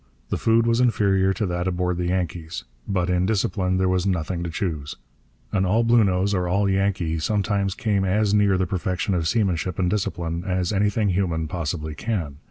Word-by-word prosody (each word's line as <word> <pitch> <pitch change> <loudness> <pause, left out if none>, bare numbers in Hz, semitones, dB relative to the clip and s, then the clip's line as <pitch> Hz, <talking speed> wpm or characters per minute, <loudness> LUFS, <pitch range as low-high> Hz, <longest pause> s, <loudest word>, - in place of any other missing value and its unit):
The - - -1
food 115 0 +3
was 115 +1 +2
inferior 100 -5 +3
to 105 - -2
that 90 0 -2
aboard 90 -1 -1
the 90 0 -1
Yankees. 85 -2 -3 0.2
But 90 -3 0
in 90 0 +1
discipline 95 -3 0
there 95 0 +2
was 95 +1 +1
nothing 85 -1 -1
to 85 - -3
choose. 80 -4 -3 0.6
An 95 -2 +1
all 105 +5 +2
Bluenose 100 -4 +3
or 90 -2 0
all 100 +3 +1
Yankee 95 -4 0
sometimes 100 +2 0
came 105 -6 0
as 100 +2 +1
near 100 -2 +4
the 95 - +1
perfection 90 +2 -2
of 85 -3 0
seamanship 95 -5 0
and 90 -2 +1
discipline 85 -4 -2
as 90 0 -1
anything 105 +1 +1
human 85 -4 0
possibly 80 -1 -3
can. 80 -6 -3
95 Hz, 180 wpm, -23 LUFS, 90-100 Hz, 0.6 s, near